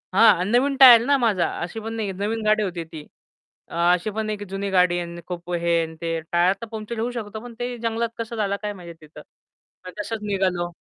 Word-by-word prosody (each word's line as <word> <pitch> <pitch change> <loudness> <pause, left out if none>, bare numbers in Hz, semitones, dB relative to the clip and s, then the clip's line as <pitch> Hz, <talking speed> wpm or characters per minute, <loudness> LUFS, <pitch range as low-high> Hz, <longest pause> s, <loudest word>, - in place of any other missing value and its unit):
हां 195 -5 +6
नवीन 275 +3 +2
टायर 240 -3 +10
ना 280 0 +3
माझा 205 -9 +1
अशी 175 +6 -5
पण 225 +1 -6
नाही 220 -2 -3
की - - -7
नवीन 225 +2 -2
गाडी 215 0 +3
होती 175 -3 -3
ती. 160 -2 -10 0.7
अ, - - -11 0.2
अशी 180 +4 0
पण 220 -1 -1
नाही 210 -1 -3
की 205 - -6
जुनी 195 +1 -3
गाडी 180 -1 +3
आहे 175 - -3
आणि 170 0 -8
खूप 175 -1 -7
अ, - - 0
हे 170 -1 +2
आणि 160 0 -6
ते. 170 -1 -3 0.2
टायर 175 +2 +4
तर - - -4
पंक्चर 220 +1 -6
होऊ 235 +2 -1
शकतो, 220 -1 -5
पण 240 0 -10
ते 245 0 -2 0.2
जंगलात 230 +1 0
कसं 230 0 -5
झाला 200 -2 0
काय 210 - -3
माहिती 175 -4 -11
तिथं. 150 - -13 0.6
मग 180 - -7
तसंच 220 +1 -4
निघालो. 190 -4 0
205 Hz, 240 wpm, -23 LUFS, 175-225 Hz, 0.7 s, टायर